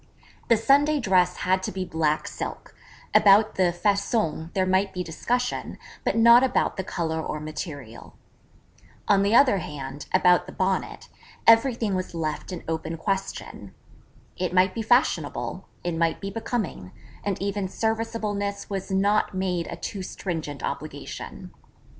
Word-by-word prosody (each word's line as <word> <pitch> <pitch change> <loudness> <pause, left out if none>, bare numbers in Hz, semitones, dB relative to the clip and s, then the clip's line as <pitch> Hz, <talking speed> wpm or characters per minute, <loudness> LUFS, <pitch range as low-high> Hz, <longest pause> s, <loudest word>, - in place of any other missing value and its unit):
The 230 - +5
Sunday 285 +6 +3
Dress 185 -6 +3
had 185 +1 +2
to - - -3
be 185 0 -3
black 160 -3 0
silk - - -6 0.4
about 210 +1 +6
the 180 -2 +2
façon 175 -3 0
there 190 -2 +1
might 190 +1 +1
be 180 - -2
discussion, 245 +9 -2 0.3
but - - 0
not 235 +2 +7
about 265 - +1
the 190 - -3
colour 160 -3 -2
or 155 - -4
material. 150 -6 -7 0.9
On 200 -1 +4
the 200 +3 +3
other 250 -7 +6
hand, 145 -4 -7
about 180 -1 +4
the - - -9
Bonnet, 190 0 -2 0.4
everything 230 -2 +4
was 185 -2 -3
left 155 +2 -3
an 180 - -6
open 160 0 -3
question. 195 +3 -4 0.6
It 180 0 -2
might 185 +1 +4
be 230 - -3
fashionable: 245 +3 +1 0.2
it 175 -1 -2
might 165 0 +1
be 195 0 -5
becoming: 215 - -4 0.3
and 200 -2 -2
even 200 0 -2
serviceableness 215 -2 -2
was 195 0 -3
not 200 +1 +1
made 180 -3 -1
a - - -5
too 200 - -5
stringent 160 -7 -5
obligation. - - -6
190 Hz, 145 wpm, -25 LUFS, 170-210 Hz, 0.9 s, not